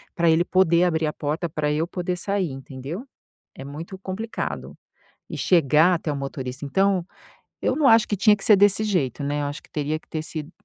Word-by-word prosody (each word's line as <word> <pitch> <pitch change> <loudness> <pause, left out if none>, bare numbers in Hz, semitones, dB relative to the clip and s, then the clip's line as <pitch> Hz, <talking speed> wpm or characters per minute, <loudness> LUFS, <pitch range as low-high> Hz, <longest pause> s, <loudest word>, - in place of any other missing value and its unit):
pra 170 -1 +3
ele 160 +2 +4
poder 175 -2 +3
abrir 160 -3 +1
a 150 - -2
porta, 150 +4 -2
pra 150 -1 -1
eu 160 +3 0
poder 180 0 -3
sair, 190 -2 -1
entendeu, 135 - -7 0.5
é 135 - -9
muito 160 +7 -8
complicado. 195 +4 -5 0.5
E - - -5
chegar 165 +1 +4
até 165 -2 -3
o - - -3
motorista, 135 -1 -5
então 190 +4 +1 0.6
eu - - +1
não 295 -3 +3
acho 225 -1 +6
que 205 - +1
tinha 210 +3 +5
que 200 - -7
ser 210 - +7
desse 205 +2 +4
jeito, 155 - -1
né, 145 +1 -1
eu - - -1
acho 145 +1 -5
que - - -21
teria 150 +1 -2
que - - -29
ter 155 - -3
sido 155 0 -6
165 Hz, 210 wpm, -24 LUFS, 145-190 Hz, 0.6 s, ser